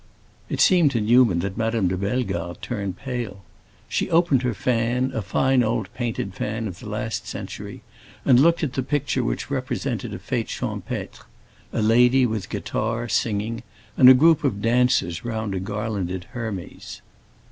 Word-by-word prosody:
It -, -, -3 dB
seemed 175 Hz, -5 st, +5 dB
to 115 Hz, -, +1 dB
Newman 110 Hz, -5 st, +4 dB
that 100 Hz, +1 st, -4 dB
Madame 115 Hz, -3 st, +1 dB
de 90 Hz, -, 0 dB
Bellegarde 95 Hz, -4 st, -2 dB
turned 100 Hz, -6 st, -4 dB
pale. 120 Hz, -7 st, -5 dB, 0.4 s
She -, -, -1 dB
opened 165 Hz, -6 st, +3 dB
her 125 Hz, -3 st, -1 dB
fan, 125 Hz, +3 st, 0 dB
a 110 Hz, -, -1 dB
fine 130 Hz, +7 st, +2 dB
old 110 Hz, -3 st, -1 dB
painted 115 Hz, -5 st, -3 dB
fan 110 Hz, +3 st, -3 dB
of 95 Hz, -2 st, -8 dB
the 110 Hz, -, -8 dB
last 110 Hz, +1 st, -3 dB
century, -, -, -7 dB, 0.4 s
and 125 Hz, -2 st, +6 dB
looked 165 Hz, +4 st, +4 dB
at 140 Hz, -4 st, -1 dB
the 135 Hz, -, -1 dB
picture, 145 Hz, +2 st, -1 dB
which -, -, -3 dB
represented -, -, -3 dB
a -, -, -5 dB
fête -, -, -3 dB
champêtre—a 110 Hz, -, -6 dB
lady 125 Hz, +4 st, +5 dB
with 110 Hz, -5 st, -2 dB
a -, -, -22 dB
guitar, 115 Hz, +2 st, -2 dB
singing, 110 Hz, +2 st, -1 dB, 0.3 s
and 125 Hz, -, +8 dB
a 130 Hz, -, +10 dB
group 160 Hz, +3 st, +4 dB
of 110 Hz, -8 st, 0 dB
dancers 115 Hz, -7 st, +2 dB
round 110 Hz, -3 st, -3 dB
a 95 Hz, -, -2 dB
garlanded 100 Hz, -3 st, -3 dB
Hermes. 110 Hz, -7 st, -6 dB
115 Hz, 160 wpm, -23 LUFS, 100-125 Hz, 0.4 s, a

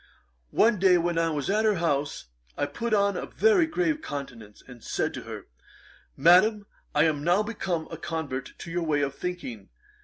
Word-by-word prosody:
One 215 Hz, -, +3 dB
day 185 Hz, -1 st, +5 dB
when 170 Hz, 0 st, 0 dB
I 165 Hz, 0 st, +2 dB
was 150 Hz, -3 st, -2 dB
at 210 Hz, +2 st, +2 dB
her 215 Hz, -2 st, +3 dB
house, 145 Hz, -4 st, -1 dB, 0.3 s
I -, -, +1 dB
put 235 Hz, 0 st, -4 dB
on 200 Hz, -1 st, +3 dB
a -, -, -4 dB
very 400 Hz, -7 st, +3 dB
grave 315 Hz, -1 st, 0 dB
countenance, 125 Hz, -, -8 dB
and 125 Hz, -3 st, -13 dB
said -, -, -2 dB
to -, -, -6 dB
her, -, -, -8 dB, 0.7 s
"Madam, 185 Hz, +8 st, +5 dB, 0.3 s
I 150 Hz, -, +5 dB
am 155 Hz, -3 st, +1 dB
now 175 Hz, +5 st, +3 dB
become 185 Hz, -7 st, -3 dB
a -, -, -6 dB
convert 160 Hz, -6 st, -4 dB
to 170 Hz, -, -8 dB
your 175 Hz, +1 st, -1 dB
way 155 Hz, -3 st, +1 dB
of 140 Hz, -1 st, -1 dB
thinking. 140 Hz, -, -6 dB
170 Hz, 185 wpm, -27 LUFS, 145-210 Hz, 0.7 s, day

